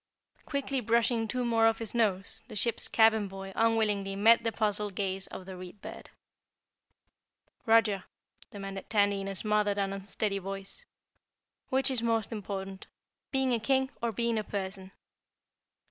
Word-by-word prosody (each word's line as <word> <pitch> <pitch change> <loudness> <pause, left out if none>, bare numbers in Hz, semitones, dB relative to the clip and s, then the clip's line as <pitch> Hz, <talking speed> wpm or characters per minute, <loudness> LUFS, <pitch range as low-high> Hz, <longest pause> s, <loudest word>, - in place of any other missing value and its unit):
Quickly 275 -1 -1
brushing 230 0 +2
two 250 +2 -1
more 225 -1 +4
off 225 0 +2
his 225 -2 -4
nose, 200 -5 0
the - - -10
ship's 230 +2 +1
cabin 220 -2 +4
boy 195 0 -8
unwillingly 210 -4 +1
met 225 +4 +5
the 225 - 0
puzzled 210 -2 -1
gaze 195 -1 -2
of 185 - -9
the 190 0 -8
Read 180 +2 -10
Bird. - - -9 1.6
"Roger," 225 -4 +4 0.4
demanded 195 -1 -7
Tandy 205 -2 +2
in 195 - -5
a 195 - -4
smothered 210 0 +1
and 195 -1 0
unsteady 195 +1 -1
voice, 195 - -7 0.8
"which 265 +1 +2
is 250 -3 -1
most 225 -2 0
important, 195 -3 -5 0.4
being 265 -2 +2
a 235 - +2
King 265 +3 +1
or 235 0 0
being 230 +1 0
a - - -3
person?" 190 -2 -5
210 Hz, 150 wpm, -30 LUFS, 195-230 Hz, 1.6 s, met